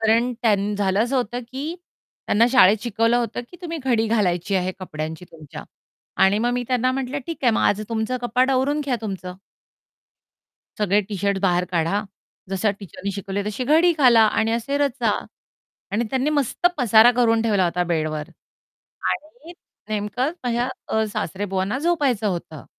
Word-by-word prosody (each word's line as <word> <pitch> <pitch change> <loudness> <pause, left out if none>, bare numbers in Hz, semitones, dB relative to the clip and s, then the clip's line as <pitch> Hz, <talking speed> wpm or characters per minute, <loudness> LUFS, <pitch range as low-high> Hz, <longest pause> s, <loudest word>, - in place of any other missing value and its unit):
कारण 230 +3 +2
त्यां 210 -2 +2
झालं 195 0 +1
असं 255 +3 -1
होतं, 245 -1 -2
की 290 +5 -4 0.5
त्यांना 225 +3 +4
शाळेत 215 -5 +6
शिकवलं 230 0 +1
होतं, 240 0 -2
की 355 - -12
तुम्ही 335 -1 -4
घडी 235 -4 +2
घालायची 200 -3 0
आहे 185 0 -1
कपड्यांची 160 -1 -6
तुमच्या. 155 -3 -10 0.6
आणि 195 +2 +4
मग 240 +2 +1
मी 245 0 -1
त्यांना 255 0 +2
म्हटलं, 270 +1 -3
ठीक 330 - -5
आहे, 240 - +6
मग 220 - +1
आज 205 - +2
तुमचं 225 +2 -1
कपाट 250 +2 +2
आवरून 270 +3 +1
घ्या 275 -4 -1
तुमचं. 190 -4 -5 1.4
सगळे 205 -1 +3
टी-शर्ट 200 -1 -1
बाहेर 180 -2 +2
काढा, 170 +4 +1 0.5
जशा 195 +2 +1
टीचरनी 200 +1 -6
शिकवली 195 +1 -4
तशी 215 +4 -3
घडी 320 +6 +4
घाला 245 -5 +6 0.2
आणि 225 0 +1
असे 235 +5 -1
रचा. 270 -5 +1 0.8
आणि 225 +4 +1
त्यांनी 265 +3 0
मस्त 290 +3 +1
पसारा 230 -2 +6
करून 230 -2 +3
ठेवला 205 -5 +2
होता 175 +1 0
बेडवर. 155 -2 -2 0.8
आणि 310 +2 -7 0.4
नेमकं 215 +4 -1
अ, - - -2
माझ्या 240 -2 -1
सासरेबुवांना 195 +4 -2
झोपायचं 285 -9 +1
होतं. 170 -5 -4
225 Hz, 155 wpm, -22 LUFS, 195-255 Hz, 1.4 s, शाळेत